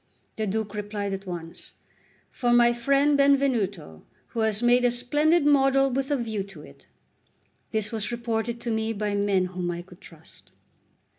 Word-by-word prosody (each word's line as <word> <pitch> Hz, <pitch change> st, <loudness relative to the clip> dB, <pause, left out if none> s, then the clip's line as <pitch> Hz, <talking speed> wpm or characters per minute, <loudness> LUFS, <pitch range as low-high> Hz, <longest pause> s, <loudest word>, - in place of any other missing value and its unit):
The 215 Hz, -1 st, -2 dB
Duke 215 Hz, +1 st, -3 dB
replied 205 Hz, -1 st, -4 dB
at 195 Hz, 0 st, -6 dB
once: 170 Hz, -2 st, -8 dB, 0.6 s
"For 245 Hz, -2 st, -1 dB
my 240 Hz, 0 st, +5 dB
friend 275 Hz, +4 st, +2 dB
Benvenuto, 240 Hz, -, +1 dB, 0.3 s
who 230 Hz, -, -5 dB
has 220 Hz, 0 st, +2 dB
made 245 Hz, +1 st, +4 dB
a 245 Hz, -, +4 dB
splendid 295 Hz, +7 st, +2 dB
model 270 Hz, -1 st, +4 dB
with 270 Hz, +2 st, -2 dB
a 290 Hz, -, +1 dB
view 220 Hz, -4 st, -3 dB
to 190 Hz, -6 st, -10 dB
it." 70 Hz, -, -17 dB, 0.8 s
This 215 Hz, -1 st, -2 dB
was 215 Hz, -1 st, -3 dB
reported 235 Hz, 0 st, -3 dB
to 235 Hz, -, -3 dB
me 220 Hz, 0 st, -1 dB
by 210 Hz, -1 st, -2 dB
men 200 Hz, -2 st, +1 dB
whom 180 Hz, -1 st, -3 dB
I 175 Hz, 0 st, -4 dB
could 180 Hz, 0 st, -17 dB
trust. 165 Hz, -3 st, -16 dB
220 Hz, 165 wpm, -25 LUFS, 200-245 Hz, 0.8 s, my